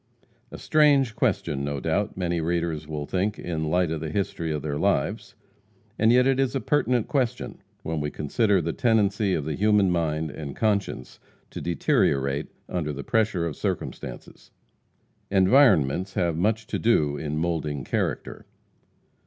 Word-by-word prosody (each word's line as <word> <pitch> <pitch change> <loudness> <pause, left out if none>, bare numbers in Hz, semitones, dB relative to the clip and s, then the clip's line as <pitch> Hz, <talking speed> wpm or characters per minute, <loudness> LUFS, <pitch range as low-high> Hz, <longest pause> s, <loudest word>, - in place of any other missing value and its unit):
A - - -9
strange 140 -6 +3
question, 70 - 0
no 70 0 -2
doubt, - - -1
many 85 -2 -1
readers 85 -2 -2
will 75 -2 -4
think, 95 +6 -1
in 80 -3 -4
the 80 - -1
light 90 0 +1
of 80 -2 -3
the 80 - -3
history 85 -2 -2
of 75 -2 -3
their 75 -1 -3
lives. - - -1 0.6
And 110 +1 +5
yet 125 +1 +5
it 135 0 +2
is 135 0 +1
a - - +1
pertinent 125 -5 +1
question, 130 -5 -2 0.2
when 80 -1 -2
we 75 - -2
consider 95 +7 +1
the 85 0 -2
tendency 105 -3 +2
of 75 - -3
the 80 - -2
human 105 0 +3
mind 80 -2 -1
and 70 -1 -7
conscience 100 - -1 0.3
to - - -6
deteriorate 70 -4 +1 0.2
under 80 -4 -2
the 70 -1 -6
pressure 110 -7 +1
of 80 -4 -3
circumstances. - - -5 0.8
Environments 95 - +4
have 85 -3 +1
much 110 +6 0
to - - -3
do 75 -11 +2
in 75 0 -4
molding 80 -4 -2
character. - - -3
85 Hz, 160 wpm, -25 LUFS, 75-110 Hz, 0.8 s, And